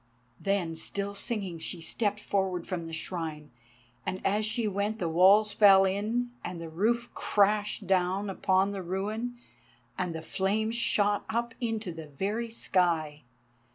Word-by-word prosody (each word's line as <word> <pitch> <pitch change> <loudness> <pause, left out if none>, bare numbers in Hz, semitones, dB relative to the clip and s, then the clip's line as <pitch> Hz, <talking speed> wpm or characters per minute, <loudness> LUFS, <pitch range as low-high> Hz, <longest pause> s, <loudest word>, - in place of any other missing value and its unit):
_" - - -16
Then, 195 -4 0
still 200 +5 -3
singing, 200 -4 -3
she 175 +2 -3
stepped 205 +5 -1
forward 190 -4 -1
from 170 -3 -4
the - - -8
Shrine, 160 -3 -5 0.5
and 185 - -3
as 210 +2 +2
she 220 0 0
went 205 +2 -1
the 180 - -1
walls 195 +6 +5
fell 195 -2 +7
in, 220 +6 -1
and 180 -1 -5
the 165 -1 -6
roof 235 +8 0
crashed 210 0 +1
down 190 +2 +1
upon 190 0 +2
the 195 -1 -4
ruin 210 +7 -3 0.6
and 180 -3 -2
the 160 - -5
flames 215 +6 0
shot 205 -3 +2
up 235 +1 -1
into 225 -5 -2
the 160 -1 -8
very 205 +10 -2
sky. 170 -8 0
195 Hz, 155 wpm, -29 LUFS, 180-215 Hz, 0.6 s, fell